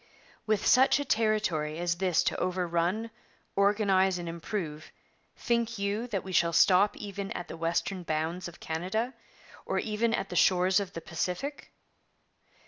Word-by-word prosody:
With 215 -1 +1
such 260 +2 +5
a 285 - -2
territory 210 - 0
as 170 0 -1
this 185 -2 +2
to - - 0
overrun, 180 +4 -1 0.4
organize, 195 -2 +3
and 175 -1 -6
improve, 165 -2 -5 0.5
think 235 -1 0
you 200 +4 -2
that 200 -6 -3
we 190 - -7
shall 170 -2 +2
stop 190 +4 +4
even 200 -1 -5
at 175 - -6
the - - -7
western 170 +3 -1
bounds 165 +2 -2
of 175 - -12
Canada, 190 +10 -2 0.5
or - - -2
even 220 +1 0
at 195 - -3
the 180 - -6
shores 185 +1 +4
of 200 -2 -5
the 165 - -6
Pacific? 180 - -4
190 Hz, 150 wpm, -29 LUFS, 170-215 Hz, 0.5 s, such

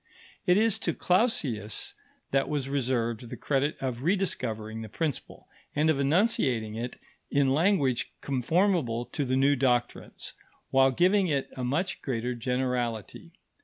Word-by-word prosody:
It 180 +1 +5
is 220 0 +3
to - - -1
Clausius 135 - 0 0.4
that 135 0 +2
was 145 -3 -1
reserved 120 -4 -1
the - - -6
credit 145 +1 0
of 125 -3 -3
rediscovering 115 - -1
the 110 - -7
principle, 150 +4 -4 0.3
and 155 +2 +4
of 140 - -1
enunciating 140 - +2
it 120 +3 -5 0.3
in 140 -2 +3
language 150 - +2
conformable 140 - +1
to 145 - -3
the 130 0 0
new 140 +2 +4
doctrines, 125 -2 -1 0.4
while 135 0 +5
giving 185 +7 +3
it 140 -4 -1
a 130 - -4
much 145 +9 -1
greater 125 -1 -2
generality. 125 - -2
135 Hz, 135 wpm, -28 LUFS, 120-160 Hz, 0.4 s, It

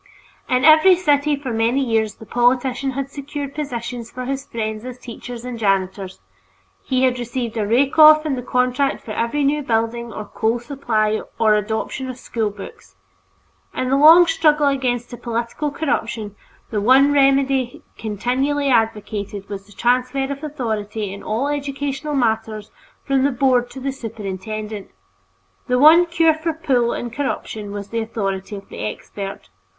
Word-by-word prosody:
In 255 +1 +2
every 315 +4 +7
city 295 -4 +2
for 270 -4 -5
many 230 +4 +1
years 225 -5 0
the 220 - -13
politician 250 +3 +1
had 275 +1 -4
secured 280 0 -6
positions 240 -5 -5
for 255 0 -6
his 270 +1 -4
friends 220 -1 -4
as 250 0 -7
teachers 245 0 -9
and 245 -2 -6
janitors; 195 -2 -1 0.6
he 255 0 0
had 250 -1 +2
received 240 -1 -4
a 215 -2 -1
rake 265 +7 +2
off 310 0 +8
in 300 - 0
the 250 - -4
contract 250 +2 0
for 220 - -6
every 235 +7 -1
new 295 +2 +1
building 230 -1 -1
or 215 - -6
coal 220 +3 -1
supply 230 -4 -1 0.2
or 220 -2 +4
adoption 220 +5 -2
of 255 - -6
school 225 -4 -2
books. 195 - -12 0.8
In 255 - -1
the - - +4
long 320 +5 +8
struggle 310 -3 +3
against 250 -3 -1
this 240 - -8
political 235 +5 -3
corruption, 225 -8 -3 0.4
the 210 -2 -1
one 265 +6 +5
remedy 275 -2 +2
continually 260 +7 -1
advocated 210 -3 -1
was 195 -1 -7
the - - -18
transfer 255 +5 0
of 280 +2 -6
authority 220 -8 -3
in 200 - -9
all 230 +6 -1
educational 285 0 -3
matters 220 -4 -1 0.3
from 270 -1 +1
the 280 - +3
Board 250 -2 +2
to 265 - -9
the 270 +1 -2
superintendent. 215 -3 -6 0.8
The 250 - +2
one 320 +6 +7
cure 330 -1 +3
for 315 +1 -3
"pull" 255 -7 +1
and 240 -1 -5
corruption 220 -6 -4
was 200 0 -6
the 230 - -2
authority 205 -3 -3
of 200 0 -10
the - - -9
"expert." 195 - -6
245 Hz, 160 wpm, -20 LUFS, 220-275 Hz, 0.8 s, off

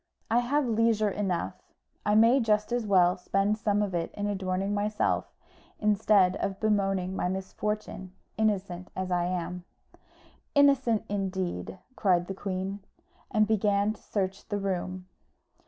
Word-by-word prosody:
"I 235 - +5
have 275 +4 +1
leisure 225 -2 +2
enough: 185 -4 -2 0.5
I 210 - +4
may 230 +5 +6
just 210 -2 +1
as 240 -3 -1
well 180 -2 +4
spend 195 +3 0
some 205 0 +1
of 200 -3 -3
it 170 -1 -2
in 205 - -3
adorning 195 0 -1
myself, 210 +1 0 0.5
instead 205 -3 +3
of 195 0 -3
bemoaning 195 -3 0
my - - 0
misfortune 190 0 -4 0.2
innocent 195 -4 -1
as 185 -1 -3
I 175 -1 +1
am." 180 0 -3 0.9
"Innocent, 270 -6 +4
indeed!" 190 - -3 0.2
cried 180 -4 +2
the 195 - -5
queen, 195 0 -4 0.5
and 215 0 +3
began 205 -1 +2
to - - -18
search 195 -1 -3
the 205 - -1
room. 185 -2 -3
200 Hz, 140 wpm, -28 LUFS, 185-215 Hz, 0.9 s, may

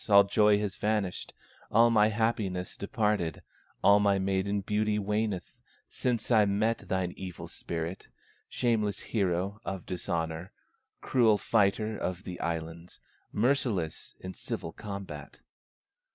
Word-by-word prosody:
all 100 -1 +9
joy 105 +1 +4
has 105 -1 -3
vanished, 105 -3 -1 0.4
All 115 +2 +5
my 105 -2 +5
happiness 105 -5 -1
departed, 105 - -1 0.4
All 100 0 +7
my 100 -1 +3
maiden 95 +1 0
beauty 105 +1 0
waneth 105 -3 -1 0.4
Since 120 -2 -1
I 110 -3 +6
met 110 +3 +1
thine 95 -1 0
evil 90 -3 -7
spirit, 85 +2 -5 0.4
Shameless 110 -4 0
hero 100 -1 -1
of 95 -3 -5
dishonor, 85 -1 -3 0.5
Cruel 115 -5 +4
fighter 105 +1 +2
of 90 +1 -3
the 90 -3 -7
islands, 85 +1 -4 0.3
Merciless 110 - 0
in 95 0 -7
civil 80 - -5
combat." 100 -9 -7
100 Hz, 120 wpm, -30 LUFS, 90-110 Hz, 0.5 s, all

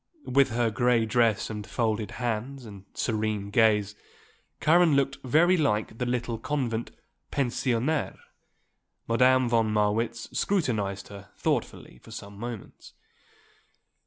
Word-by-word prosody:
With 135 +1 +3
her 115 0 0
grey 120 +1 +2
dress 110 -2 +1
and 105 -1 -6
folded 110 -3 -1
hands 125 +2 -3
and 100 -3 -11
serene 105 -3 -2
gaze 105 -2 +3 0.7
Karen 165 -1 +4
looked 140 0 +1
very 160 +8 +4
like 110 - 0
the 125 - -1
little 120 -2 -2
convent 120 -6 -2 0.4
pensionnaire. 130 +2 0 0.9
Madame 130 +2 +4
von 115 -2 +2
Marwitz 110 +2 0
scrutinized 105 - -1
her 100 0 -11
thoughtfully - - -2
for - - -17
some 100 0 -9
moments. 120 -2 -8
115 Hz, 115 wpm, -27 LUFS, 105-130 Hz, 0.9 s, Karen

